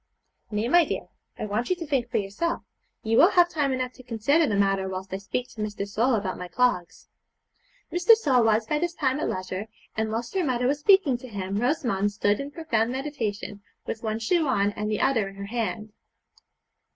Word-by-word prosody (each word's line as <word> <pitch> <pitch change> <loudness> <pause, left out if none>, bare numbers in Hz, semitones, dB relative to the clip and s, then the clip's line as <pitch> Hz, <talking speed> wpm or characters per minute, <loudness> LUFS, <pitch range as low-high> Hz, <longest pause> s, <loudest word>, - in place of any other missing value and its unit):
'Nay, 210 +2 -1
my 345 +6 +6
dear, - - -4 0.3
I - - -3
want 215 +4 -2
you 365 - +2
to 345 -2 -6
think 265 -5 0
for - - 0
yourself; 210 +13 -2 0.4
you 225 +1 +1
will 345 - +8
have 350 -3 +4
time 290 -3 0
enough 255 -1 -2
to - - -14
consider 250 +7 +2
the 210 - 0
matter 195 -1 +1
whilst 190 0 -6
I - - -1
speak 245 +5 -3
to 215 - -8
Mr. 205 -1 -3
Sole 230 +5 +2
about 200 -3 -3
my 180 - -5
clogs.' 180 -6 0 0.9
Mr. 355 +6 +6
Sole 270 - +3
was 220 0 +3
by 300 +5 0
this 345 +1 -2
time 265 -1 0
at - - -1
leisure, 185 +2 -4 0.3
and 220 0 -1
whilst 230 +2 -3
her 380 -2 +1
mother 250 -4 0
was 280 +3 +1
speaking 310 -8 +4
to 255 - -10
him 200 -3 -4
Rosamond 235 -5 +1
stood 205 0 +1
in 280 - -4
profound 285 -8 -1
meditation, 235 -7 -4 0.2
with 225 - -4
one 220 -1 -2
shoe 310 +8 +1
on 205 -6 +2
and 210 +1 -4
the 215 - -1
other 230 -7 +2
in 195 - -13
her 200 0 -6
hand. 215 -1 -3
230 Hz, 210 wpm, -26 LUFS, 205-285 Hz, 0.9 s, will